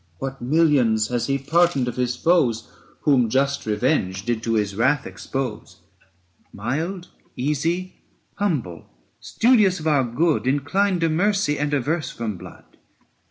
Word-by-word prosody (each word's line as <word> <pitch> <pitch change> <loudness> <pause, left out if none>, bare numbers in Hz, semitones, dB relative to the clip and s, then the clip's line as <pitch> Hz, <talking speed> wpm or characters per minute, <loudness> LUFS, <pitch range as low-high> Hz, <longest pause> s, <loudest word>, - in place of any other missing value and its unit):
What 135 +4 -6
millions 125 -6 +2
has 120 -1 -1
he 135 0 +1
pardoned 150 -1 +2
of 120 - -3
his 125 -1 -1
foes 125 -9 +1 0.3
Whom 130 -6 +3
just 140 +1 0
revenge 105 -4 0
did 120 -2 -1
to 115 0 -1
his 105 -2 -1
wrath 120 +6 +1
expose? 130 -5 -5 0.7
Mild, 160 - -4 0.3
easy, 165 +7 -2 0.4
humble, 140 - -2 0.3
studious 215 -7 +3
of 155 - -8
our 145 -4 +3
good, 145 +7 +1
335 130 - +3
Inclined 185 +6 0
to 165 - +2
mercy 180 -2 +1
and 145 0 -1
averse 150 +3 -1
from 110 -3 -4
blood. 90 -1 -14
140 Hz, 140 wpm, -22 LUFS, 120-165 Hz, 0.7 s, Whom